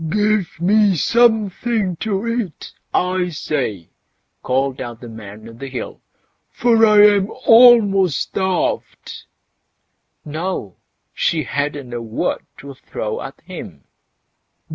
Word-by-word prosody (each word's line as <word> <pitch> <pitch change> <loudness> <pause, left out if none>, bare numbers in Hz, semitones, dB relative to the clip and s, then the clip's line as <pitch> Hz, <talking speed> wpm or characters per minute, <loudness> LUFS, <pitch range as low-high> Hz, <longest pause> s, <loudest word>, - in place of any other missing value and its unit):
"Give 210 -3 0
me 200 +2 +3
something 220 - +1
to 205 +1 -2
eat, 230 -8 -4 0.2
I 180 0 0
say!" 130 - -4 0.5
called 135 +1 -1
out 120 -3 -7
the 120 - -10
Man 110 -1 -11
o' 115 - -11
the 135 +4 -8
Hill, 130 -1 -7 0.5
"for 230 -2 +2
I 210 -1 +6
am 205 -1 +3 0.2
almost 210 - +6
starved." 190 -2 -3 1.0
No! 155 - -4 0.4
she 160 -2 0
hadn't 145 -1 -4
a 120 - -4
word 115 -1 -3
to 140 0 -10
throw - - -5
at - - -9
him. - - -10
180 Hz, 115 wpm, -19 LUFS, 135-215 Hz, 1.0 s, I